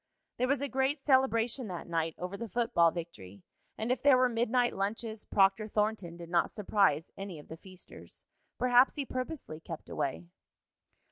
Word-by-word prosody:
There 255 - +1
was 280 0 +1
a 285 - -1
great 265 +2 0
celebration 260 -3 +2
that 180 -3 -6
night 165 -1 -1
over 180 +2 -5
the 230 +2 -6
football 225 -7 +3
victory, 100 - -8 0.3
and 225 +3 -2
if 255 -1 0
there 280 -2 +6
were 255 0 +4
midnight 240 +1 +1
lunches, 220 +2 -3
Proctor 195 +2 +3
Thornton 210 -5 -1
did 170 -1 -10
not 170 -1 +2
surprise 195 -7 +1
any 195 -4 -6
of 150 - -13
the 160 - -8
feasters. 185 +1 -13 0.3
Perhaps 250 +1 +4
he 285 - -3
purposely 255 - -5
kept 165 -1 -9
away. 140 +5 -3
215 Hz, 165 wpm, -31 LUFS, 170-250 Hz, 0.3 s, there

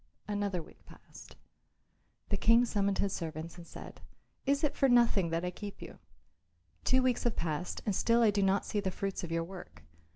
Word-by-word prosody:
Another 205 -4 -1
week - - -18
passed. - - -14 0.9
The 200 - +1
King 230 +4 +5
summoned 200 -3 0
his 200 -1 0
servants 160 0 -5
and 170 - -11
said, - - -10 0.5
"Is 280 +1 +2
it 300 - +1
for 270 - +3
nothing 235 -7 +4
that 165 +2 -1
I 180 - -2
keep 205 +2 -8
you? - - -10 0.8
Two 260 0 +3
weeks 250 -2 +1
have 240 - 0
passed 165 +2 -3
and 205 - 0
still 235 +4 +3
I 215 - +5
do 205 0 +1
not 195 +1 +2
see 210 - -1
the 195 -2 -1
fruits 195 0 -3
of 170 - -5
your 165 0 0
work. 180 - -10
200 Hz, 195 wpm, -32 LUFS, 175-230 Hz, 0.9 s, King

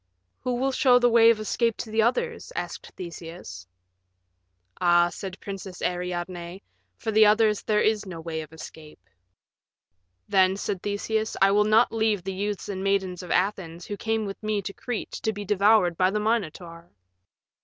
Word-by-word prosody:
"Who 250 -1 -2
will 265 +2 0
show 255 -2 +5
the 245 -1 +3
way 230 0 +7
of 230 -2 +3
escape 230 +2 0
to 220 - -6
the 220 +1 +2
others?" 465 - -1
asked - - -5
Theseus. 165 - -9 1.1
"Ah," 175 -1 +4
said 190 +2 -7
the - - -10
Princess 195 -2 -8
Ariadne, 180 0 -4 0.3
"for 220 - -3
the 215 0 +6
others 215 0 +3
there 210 -1 +1
is 215 -2 +1
no 170 -3 -7
way 160 -1 -4
of 155 - -11
escape." 160 -1 -11 1.3
"Then," 190 -1 +3
said 195 -2 -3
Theseus, 215 +2 -2
"I 195 0 +5
will 210 +1 +4
not 220 +3 +4
leave 220 -4 0
the 195 +1 -4
youths 205 +1 -3
and 190 -1 -4
maidens 190 -2 0
of 180 - -10
Athens 180 -3 -1
who 205 - -5
came 220 +1 -1
with 195 -1 -7
me 215 -1 -1
to 195 - -5
Crete 245 +1 -5
to 220 - 0
be 205 -1 -7
devoured 200 -3 +3
by 185 0 +3
the 210 +2 -1
Minotaur." 175 -6 -3
200 Hz, 175 wpm, -26 LUFS, 180-220 Hz, 1.3 s, way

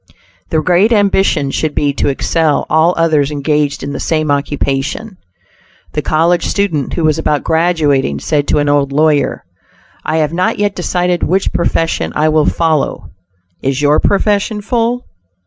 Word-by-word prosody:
The 155 -1 0
great 185 +5 +3
ambition 195 -9 +2
should 155 +1 -2
be 145 -1 +1
to - - -1
excel 150 +2 0
all 160 +3 +3
others 155 -4 +2
engaged 150 0 -1
in 140 +1 -4
the - - -5
same 155 -2 0
occupation. 145 +8 -2 0.8
The - - -1
college 170 +3 +1
student 180 -9 -1
who 170 - -2
was 155 0 +2
about 150 -3 0
graduating, 155 - +1
said 145 - -1
to - - +1
an 145 0 +1
old 145 -1 +1
lawyer: 150 -6 +1 0.6
"I 155 - -1
have 155 0 0
not 180 +2 0
yet 205 -1 0
decided 180 0 -1
which 190 +2 0
profession 165 -1 -1
I 155 +1 +2
will 155 -1 +2
follow. 155 - -1 0.5
Is 135 +2 -1
your 145 +1 +4
profession 205 +1 0
full?" 240 +2 -1
155 Hz, 155 wpm, -14 LUFS, 145-180 Hz, 0.8 s, your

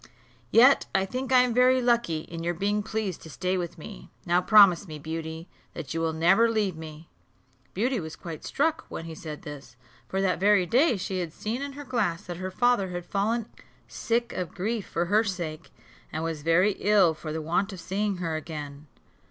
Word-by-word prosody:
Yet 255 - +6
I 190 0 +3
think 255 +6 -4
I 250 -1 +7
am 245 -2 0
very 255 +2 +5
lucky 235 -10 +1
in 165 +1 -8
your 175 +1 -1
being 205 +4 0
pleased 215 -4 -3
to 160 - -11
stay 185 +4 -2
with 175 -2 -4
me; - - -10 0.2
now 175 +1 +3
promise 200 -2 +6
me, 155 -2 -7
Beauty, 160 +2 -6 0.3
that 140 - -6
you 165 - -2
will 165 -1 +1
never 180 +9 +4
leave 210 -5 0
me." 160 0 -10 0.7
Beauty 240 +5 0
was 160 -2 -7
quite 165 -3 -8
struck 320 +3 0
when 165 - -6
he 165 - -7
said 155 -1 -8
this, 145 -6 -10 0.3
for 190 - -2
that 185 -3 +1
very 200 -1 +4
day 250 - +3
she 185 0 -3
had 170 -3 -3
seen 230 +5 -4
in 280 0 -5
her 290 +1 -8
glass 215 -10 -1
that 175 -1 -7
her 185 +1 -4
father 220 -1 +2
had 175 -1 -5
fallen 220 +3 -1 0.4
sick 235 +1 -1
of 180 -3 -5
grief 215 +2 -2
for 170 - -1
her 210 +5 +3
sake, 175 -7 -5 0.4
and 155 - -3
was 165 -2 -3
very 165 +6 +3
ill 200 -5 +4
for 155 0 -7
the 160 - -3
want 170 +6 0
of 190 - -8
seeing 195 +3 -2
her 165 -3 -2
again. 150 -2 -7
185 Hz, 200 wpm, -27 LUFS, 165-220 Hz, 0.7 s, I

